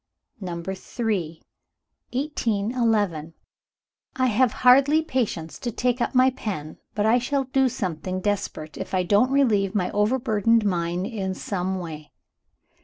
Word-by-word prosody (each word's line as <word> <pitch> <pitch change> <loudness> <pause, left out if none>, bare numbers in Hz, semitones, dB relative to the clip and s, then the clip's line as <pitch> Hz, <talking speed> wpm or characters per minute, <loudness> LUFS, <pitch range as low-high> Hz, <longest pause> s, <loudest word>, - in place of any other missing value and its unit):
Number 175 -1 -5
III. 190 -5 -3 0.7
1811. 220 - 0 0.8
"I 255 - +1
have 250 0 +3
hardly 275 +5 +5
patience 220 - -2
to 245 -3 -3
take 245 +2 0
up - - -1
my 255 +1 +5
pen 190 - -6 0.2
But 210 -1 +1
I 230 +3 +4
shall 270 +3 0
do 265 0 +2
something 185 -2 -3
desperate, 185 -6 -3
if - - -4
I 185 - +2
don't 205 +7 +3
relieve 220 -8 +2
my 185 -3 0
overburdened 225 0 +2
mind 175 -1 -1
in 195 -4 -3
some 190 -1 -3
way. 155 -5 -8
210 Hz, 130 wpm, -24 LUFS, 185-250 Hz, 0.8 s, hardly